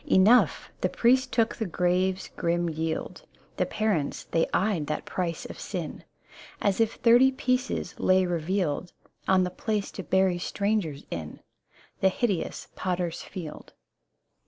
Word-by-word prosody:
Enough! 210 +7 +4
The - - +2
priest 255 +2 +3
took 230 -2 +2
the 220 - -3
grave's 180 +2 0
grim 170 0 0
yield: 160 0 -3 0.4
The - - +1
parents, 205 -10 -1
they 165 - +1
eyed 190 -7 +1
that 150 - -3
price 170 -3 -3
of - - -8
sin - - -5 0.6
As 200 +2 +1
if 225 - +1
thirty 245 +3 +6
pieces 255 0 -1
lay 185 0 +4
revealed 175 -1 -1 0.3
On 190 -1 +4
the 180 - -2
place 210 +2 -2
to - - -6
bury 190 -2 +2
strangers 200 -7 -1
in. 80 -2 -5 0.6
The 190 - +4
hideous 195 -4 -2
Potter's 175 -2 -2
Field. 160 -5 -8
185 Hz, 135 wpm, -27 LUFS, 170-215 Hz, 0.6 s, thirty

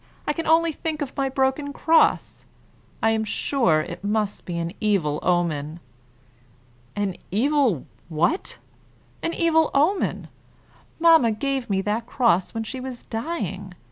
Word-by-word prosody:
I 295 - 0
can 330 +2 -4
only 330 +1 +4
think 310 0 -3
of 275 - -8
my 275 -1 0
broken 265 +2 0
cross. 325 +2 +2 0.6
I 225 - +4
am 220 0 0
sure 210 - +1
it 155 - -8
must 210 0 -1
be 175 -2 -4
an 170 +1 -3
evil 185 -9 +1
omen." 165 -3 0 1.2
"An 200 -3 -2
evil 250 - +1 0.2
what?" 170 - 0 0.6
"An 335 - -1
evil 320 -2 +3
omen. 330 +8 +1 0.7
Mamma 325 -8 +6
gave 265 +2 -2
me 195 -1 +1
that 220 +3 -2
cross 225 -8 +2
when 225 -1 -3
she 260 +4 -6
was 255 -1 -7
dying. 205 - -4
230 Hz, 140 wpm, -24 LUFS, 190-290 Hz, 1.2 s, Mamma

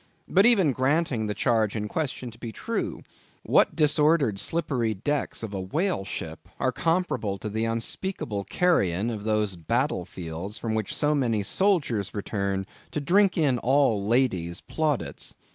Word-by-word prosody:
But 195 +4 +5
even 195 - +5
granting 130 -3 +1
the 105 - -2
charge 110 -1 +1
in 105 -1 -2
question 130 -2 -3
to 115 - -17
be 115 - -6
true; - - -3 0.4
what - - +3
disordered 150 -7 +3
slippery 125 -9 0
decks 140 +5 -2
of 105 -2 -5
a 95 - -3
whale 150 - -1
ship - - -6
are - - +1
comparable 165 - 0
to 105 - -5
the 110 +2 -1
unspeakable 115 - -2
carrion 110 - +1
of 105 -2 -6
those 105 -3 0
battle 115 - -1
fields 90 +5 -6
from 115 -1 -3
which 110 -3 -2
so 150 0 +2
many 115 -7 +1
soldiers 140 - +1
return 100 -2 -2 0.2
to - - -3
drink 190 +6 +3
in 140 -7 +2
all 130 -5 +2
ladies' 100 -7 +1
plaudits? 155 -4 -2
115 Hz, 155 wpm, -26 LUFS, 105-150 Hz, 0.4 s, But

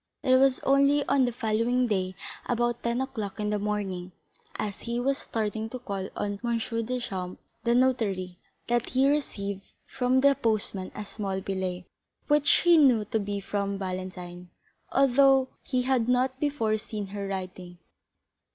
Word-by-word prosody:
It 255 0 +5
was 265 0 +4
only 280 +1 +4
on 275 -2 +3
the 245 - 0
following 235 +2 +1
day, 190 -4 -1 0.3
at - - +1
about 240 0 0
ten 235 +2 0
o'clock 220 -7 -4
in 210 0 -1
the 210 - 0
morning, 195 -3 -3 0.4
as 205 -2 -4
he 235 0 -3
was 275 +3 0
starting 220 0 -3
to 255 - -5
call 200 -6 -5
on 205 -1 -3
M. 235 -1 +1 0.3
Deschamps, 195 -8 -4 0.2
the 235 0 +2
notary, 205 -8 +1 0.3
that 240 0 0
he 265 +1 +3
received 200 -9 -1 0.2
from 255 +1 +1
the 280 0 +6
postman 215 -6 -1
a 210 - -5
small 195 -2 -3
billet, 185 -2 -3 0.4
which 295 0 +3
he 345 -1 +6
knew 250 -8 +5
to 220 +2 -1
be 200 0 -3
from 200 0 -2
Valentine, 185 -2 -6 0.4
although 270 0 +5
he 255 -2 -1
had 250 -2 +1
not 255 +1 +1
before 250 -8 0
seen 210 -1 -5
her 200 -1 -3
writing. 185 -2 -6
225 Hz, 160 wpm, -27 LUFS, 195-255 Hz, 0.4 s, the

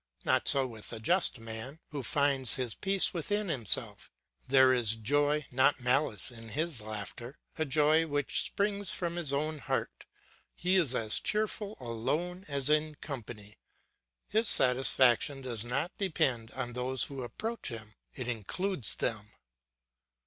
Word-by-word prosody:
Not - - +2
so 135 -1 +6 0.2
the 115 - -6
just 170 +3 +2
man, 115 +6 -6
who 145 -2 -4
finds 135 -1 +2
his 125 -4 -3
peace 195 -1 +2
within 205 +4 -2
himself; 120 - +1 0.4
there 130 0 +5
is 115 -3 +1
joy 145 +6 0
not 130 +3 +3
malice 125 -3 0
in 115 -2 -9
his 155 -1 -3
laughter, 110 - -6 0.2
a 160 - +1
joy 155 +3 +3
which 145 -1 +1
springs 200 -1 -1
from 170 -2 -2
his 170 -5 0
own 155 +2 -2
heart; - - -4 0.5
he 180 +2 0
is 165 -9 +4
as 110 -3 +1
cheerful 215 0 -2
alone 150 - -3
as 140 -2 +3
in 155 0 +2
company, 110 -8 -9 0.7
his 220 +2 +2
satisfaction 130 +1 +3
does 120 -4 -4
not 135 +9 -3
depend 130 - 0
on 125 -1 -5
those 125 0 0
who 135 -2 -4
approach 220 - -5
him; 110 -2 -8 0.2
it 130 -3 -5
includes 125 - -3
them. 105 -3 -2
135 Hz, 140 wpm, -30 LUFS, 120-160 Hz, 0.7 s, so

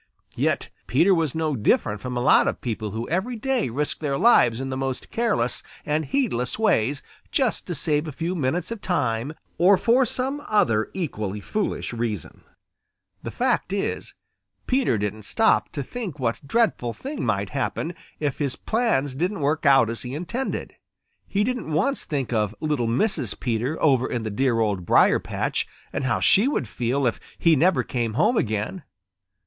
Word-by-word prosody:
Yet - - 0 0.2
Peter 170 +10 +4
was 160 -5 0
no 160 -2 0
different 105 -2 +1
from 125 -1 -4
a - - 0
lot 130 - +5
of - - -1
people 110 -4 -3
who 110 +3 -4
every 190 - -1
day 255 - 0
risk 145 +6 -2
their 140 -3 -1
lives 125 - +5
in 135 0 -4
the - - -2
most 130 -1 -3
careless 215 - 0 0.2
and 155 +1 0
heedless 135 - -1
ways 145 - +1 0.3
just 260 -6 0
to 175 - -3
save 150 +1 0
a - - -4
few 165 +5 -3
minutes 165 - -1
of 230 -3 -5
time 140 -6 -1 0.3
or 190 +3 +6
for 245 +5 +3
some 265 +5 -3
other 110 - +2
equally 105 - -3
foolish 205 - -3
reason. 115 -6 -4 0.8
The - - -5
fact - - 0
is, 195 0 -3 0.5
Peter 255 - +2
didn't 105 +1 -3
stop 225 - +2
to 140 - -3
think 195 - -6
what 125 +1 -2
dreadful 215 - +1
thing 280 - -5
might 100 0 0
happen 145 +5 -2 0.3
if 145 -4 -2
his 140 -3 -1
plans 220 - 0
didn't 180 +6 -2
work 150 +2 +1
out 135 -4 +6
as 115 +1 -4
he 125 +2 -5
intended. 235 - -3 0.5
He 205 +1 +1
didn't 250 -7 -2
once 195 - +1
think 135 -5 -2
of 105 -1 0
little 150 -6 0
Mrs. 135 - 0
Peter 125 +5 -1
over 130 -5 +3
in 120 - -2
the 110 - -3
dear 120 +1 +1
Old 100 -5 0
Briar - - +5
patch - - -2 0.3
and - - -2
how 120 - +1
she 205 +6 +4
would 275 - -1
feel 125 +5 -1
if 120 - 0 0.2
he 165 -1 +4
never 170 +5 +3
came 120 -3 -2
home 245 - +3
again. 110 - -1
145 Hz, 175 wpm, -24 LUFS, 120-195 Hz, 0.8 s, or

